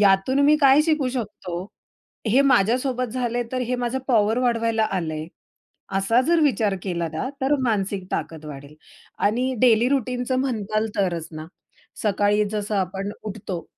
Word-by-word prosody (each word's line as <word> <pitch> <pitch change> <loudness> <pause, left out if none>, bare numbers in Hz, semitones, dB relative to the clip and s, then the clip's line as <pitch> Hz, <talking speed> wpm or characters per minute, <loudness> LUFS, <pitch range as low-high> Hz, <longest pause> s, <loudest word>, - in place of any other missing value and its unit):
यातून 200 +7 +3
मी 300 +1 +6
काय 275 +2 +6
शिकू 305 -5 +1
शकतो, 200 -8 -5 0.6
हे 250 +6 +4
माझ्यासोबत 255 +1 +2
झालंय 245 -1 -1
तर 255 - -1
हे - - +1
माझं 245 +1 -2
पॉवर 225 -1 +3
वाढवायला 230 -2 +1
आलंय. 155 -3 -3 0.7
असा 225 +6 +3
जर 340 0 +3
विचार 230 -9 +2
केला 170 -3 -2
ना, 160 +11 -3
तर 275 +2 +3
मानसिक 200 -4 -1
ताकद 160 -1 -4
वाढेल. 145 0 -10 0.4
आणि 245 +5 +1
डेली 240 -1 +5
रूटीनचं 255 -1 -1
म्हणाल 220 -4 -1
तरच 175 -5 -1
ना, 155 0 -7 0.6
सकाळी 205 0 +2
जसं 210 0 -2
आपण 195 +1 -2
उठतो 195 -4 -6
220 Hz, 145 wpm, -23 LUFS, 195-255 Hz, 0.7 s, मी